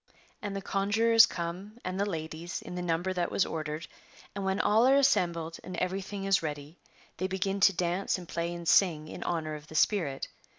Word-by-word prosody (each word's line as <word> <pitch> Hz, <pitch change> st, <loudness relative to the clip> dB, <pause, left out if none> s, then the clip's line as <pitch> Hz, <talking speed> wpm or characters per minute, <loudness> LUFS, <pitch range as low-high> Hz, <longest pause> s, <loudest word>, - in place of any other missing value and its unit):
And 205 Hz, -2 st, -4 dB
the 195 Hz, -, -4 dB
conjurors 220 Hz, +4 st, +4 dB
come, 180 Hz, +6 st, -5 dB
and 185 Hz, +1 st, -3 dB
the 200 Hz, +1 st, +1 dB
ladies, 160 Hz, 0 st, -5 dB
in -, -, -8 dB
the 180 Hz, -, -3 dB
number 175 Hz, +2 st, -1 dB
that 175 Hz, -1 st, -1 dB
was -, -, +2 dB
ordered, 155 Hz, 0 st, -4 dB, 0.5 s
and 200 Hz, -, -4 dB
when 190 Hz, +1 st, 0 dB
all 220 Hz, +4 st, +4 dB
are 270 Hz, -, +6 dB
assembled 170 Hz, -12 st, +2 dB
and 185 Hz, -, -6 dB
everything 195 Hz, +2 st, -3 dB
is 195 Hz, -1 st, +3 dB
ready, 150 Hz, +1 st, -6 dB, 0.4 s
they 185 Hz, -, -1 dB
begin 195 Hz, +1 st, -1 dB
to 195 Hz, -, +6 dB
dance 180 Hz, +3 st, 0 dB
and 180 Hz, -2 st, -10 dB
play 170 Hz, +1 st, -2 dB
and 170 Hz, -1 st, -6 dB
sing 160 Hz, -6 st, +4 dB
in -, -, -8 dB
honour 160 Hz, -3 st, -2 dB
of 150 Hz, 0 st, -8 dB
the 160 Hz, -, -11 dB
spirit. 155 Hz, -6 st, +1 dB
180 Hz, 200 wpm, -30 LUFS, 165-195 Hz, 0.5 s, are